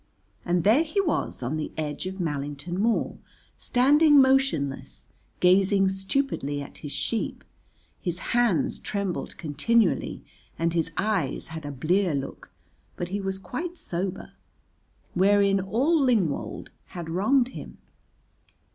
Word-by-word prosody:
And 175 -1 +1
there 225 +9 +5
he 330 +5 -1
was 325 - -1
on 135 +6 -2
the 155 - -4
edge 155 +3 -3
of 190 +1 -6
Mallington 145 +2 -3
Moor 225 +2 0 0.4
standing 290 +4 +5
motionless, 265 - +1 0.3
gazing 190 +2 +4
stupidly 190 - -1
at 140 - -9
his 145 - -7
sheep; 150 +11 -2 0.6
his 175 -1 -2 0.2
hands 235 -8 +2
trembled 200 -4 -3
continually 205 +7 +1 0.3
and 165 0 0
his 165 -1 +1
eyes 205 -5 -1
had 160 -2 -7
a - - -4
blear 170 +5 +1
look, 135 -1 -6 0.5
but 175 - -4
he 200 +2 -2
was 190 0 -2
quite 330 - -5
sober, 185 - -4 0.8
wherein 200 +1 +4
all 255 - +2
Lingwold 220 - 0 0.2
had 175 -2 -7
wronged 240 +10 +2
him. - - -9
190 Hz, 125 wpm, -26 LUFS, 165-235 Hz, 0.8 s, there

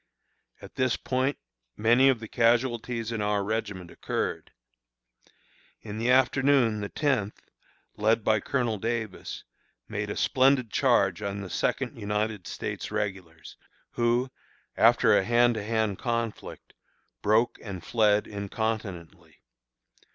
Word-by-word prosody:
At - - -11
this 130 -2 +1
point 130 +2 -1 0.4
many 120 +5 +5
of 130 -4 +2
the 110 - -8
casualties 120 0 +1
in 115 -2 -2
our 105 -1 0
regiment 105 -4 -4
occurred. - - -3 1.3
In 105 0 -7
the 120 +2 0
afternoon 130 -3 +3
the 100 - -4
Tenth, 130 -9 -2 0.5
led 110 +1 +2
by 110 0 +3
Colonel 120 -2 -1
Davis, 110 -2 -4 0.4
made - - -4
a - - -4
splendid 130 -3 +3
charge - - +2
on 100 0 -4
the 95 - -8
Second - - -1
United 105 -1 -2
States - - -5
Regulars, 90 -5 -5 0.3
who, 120 +2 +1 0.4
after - - +5
a - - +3
hand 120 +2 +3
to 110 -2 -4
hand 110 -2 -1
conflict, 115 -2 -4 0.5
broke 110 +3 +2
and 95 -5 -7
fled 105 -2 +2
incontinently. 100 -3 -5
110 Hz, 120 wpm, -27 LUFS, 105-120 Hz, 1.3 s, many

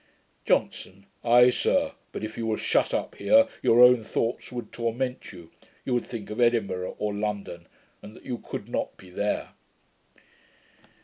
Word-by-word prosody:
JOHNSON. 100 +1 -1 0.2
'Ay, 120 +1 +6
sir; 280 - +1 0.2
but - - -6
if 110 0 -5
you 115 - -3
were 110 - 0
shut - - +1
up - - -2
here, 280 +1 +5
your 120 +2 +5
own 125 -2 +6
thoughts 115 +2 -2
would 120 -1 -6
torment 120 +2 -3
you: 85 -4 -13 0.3
you 130 - -1
would 120 - 0
think 110 -3 -7
of 110 - -3
Edinburgh 100 -6 +1
or 105 -1 -2
London, 105 -1 -4 0.3
and 105 - -12
that - - -16
you 125 -3 -4
could - - -7
not - - -3
be 90 -1 -15
there.' 100 +3 -2
115 Hz, 165 wpm, -26 LUFS, 105-125 Hz, 0.3 s, Ay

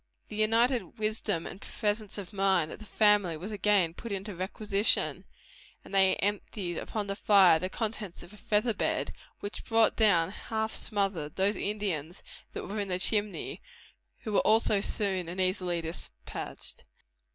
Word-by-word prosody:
The - - -7
united 230 +4 +2
wisdom 215 -5 -1
and 190 - -8
presence 210 -1 -2
of 200 0 -7
mind 190 -5 +2
of - - -8
the 215 - -10
family 205 -6 +3
was 190 +7 -6
again 200 -4 +2
put 230 +5 -8
in 195 -1 -2
requisition, 200 +2 0 0.6
and - - -12
they 190 -1 +5
emptied 195 -3 -2
upon 215 -2 -3
the 200 0 -3
fire 195 -6 +6
the 185 - -2
contents 210 -4 -4
of 175 +4 -14
a - - -13
feather 215 +3 +1
bed, - - -1 0.3
which 205 - -5
brought 225 -1 +3
down, 185 -6 +4
half 220 +1 -3
smothered, 195 -8 -1
those 195 +2 +2
Indians 190 -6 -3 0.3
that - - -5
were 210 +2 -4
in 200 - -2
the 180 -1 0
chimney, 205 +2 0 0.6
who 215 - -4
were - - +5
also 215 -2 +3
soon 190 -5 -1
and 180 +2 -6
easily 185 -2 0
despatched. 160 - -6
200 Hz, 160 wpm, -30 LUFS, 185-215 Hz, 0.6 s, fire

